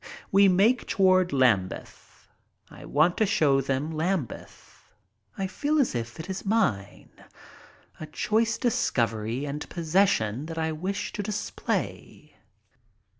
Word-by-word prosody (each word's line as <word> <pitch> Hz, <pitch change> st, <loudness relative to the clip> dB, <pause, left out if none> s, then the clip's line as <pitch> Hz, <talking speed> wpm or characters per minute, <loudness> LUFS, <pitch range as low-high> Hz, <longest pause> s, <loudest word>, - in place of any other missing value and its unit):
We 195 Hz, +1 st, +6 dB
make 200 Hz, +7 st, +3 dB
toward 185 Hz, -2 st, +3 dB
Lambeth, 115 Hz, -9 st, -1 dB, 0.4 s
I -, -, -12 dB
want 155 Hz, +5 st, +2 dB
to 220 Hz, -, +3 dB
show 140 Hz, -6 st, +3 dB
them 135 Hz, +3 st, -2 dB
Lambeth. 160 Hz, -, -5 dB, 0.5 s
I 195 Hz, -, -2 dB
feel 290 Hz, +11 st, -1 dB
as 270 Hz, -, +2 dB
if 120 Hz, +3 st, -5 dB
it 160 Hz, -, -6 dB
is 190 Hz, 0 st, -5 dB
mine 195 Hz, -, -1 dB, 0.5 s
— -, -, -26 dB
a 155 Hz, -, -7 dB
choice 225 Hz, +8 st, 0 dB
discovery 120 Hz, -, -1 dB
and 145 Hz, +1 st, -5 dB
possession 155 Hz, -, +1 dB
that 165 Hz, 0 st, -7 dB
I 160 Hz, 0 st, -1 dB
wish 190 Hz, +6 st, -4 dB
to -, -, -3 dB
display. 210 Hz, 0 st, -4 dB
165 Hz, 125 wpm, -26 LUFS, 135-200 Hz, 0.5 s, We